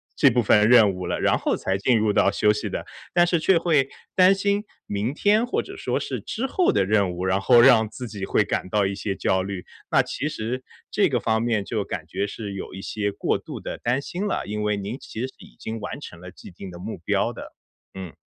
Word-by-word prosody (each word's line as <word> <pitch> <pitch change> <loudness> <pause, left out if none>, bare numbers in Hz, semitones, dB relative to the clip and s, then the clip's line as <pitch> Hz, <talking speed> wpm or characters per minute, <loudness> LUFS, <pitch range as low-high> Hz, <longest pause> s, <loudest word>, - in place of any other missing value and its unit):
这 140 - +5
部 120 -1 +1
分 105 +1 +4
任 115 -5 +7
务 90 0 -5
了， - - -2
然 - - +2
后 - - 0
才 95 0 -1
进 120 +3 +3
入 105 -1 +1
到 100 - +4
休 105 +1 +3
息 105 - -4
的。 - - -4 0.3
但 175 0 +4
是 170 -1 +1
却 180 +3 +4
会 155 -5 +2 0.2
担 185 +1 +6
心 200 +1 0 0.2
明 105 +5 -2
天 210 +8 +2
或 - - -1
者 - - -10
说 - - -1
是 - - -4
之 235 - -4
后 350 +7 +2
的 95 - +2
任 100 -3 +2
务， 90 +1 -4
然 95 +1 +1
后 120 +3 +6
让 120 -4 +6
自 125 +2 -7
己 105 -3 -7
会 - - +2
感 95 - -3
到 105 0 +2
一 95 - -1
些 100 0 -3
焦 95 0 +1
虑。 95 -1 -5 0.2
那 - - +4
其 145 - -3
实 125 -1 -4 0.3
这 - - +3
个 - - +1
方 110 0 0
面 115 -4 0
就 110 -2 -2
感 80 - -5
觉 90 +5 -3
是 100 -1 -6
有 95 - -7
一 95 - -7
些 105 -2 -2
过 - - -1
度 - - -8
地 - - -6
担 125 +3 0
心 185 +7 -4
了， - - -2
因 105 +1 -4
为 105 -1 0
您 100 +6 -5
其 110 - -7
实 130 - -1
已 - - -15
经 110 0 -5
完 105 - -6
成 90 - -10
了 90 - -9
既 95 - -13
定 95 +2 -9
的 90 - -10
目 100 +1 -6
标 85 - 0
的。 - - -10 0.4
嗯。 95 -4 -7
110 Hz, 265 characters per minute, -24 LUFS, 100-130 Hz, 0.4 s, 任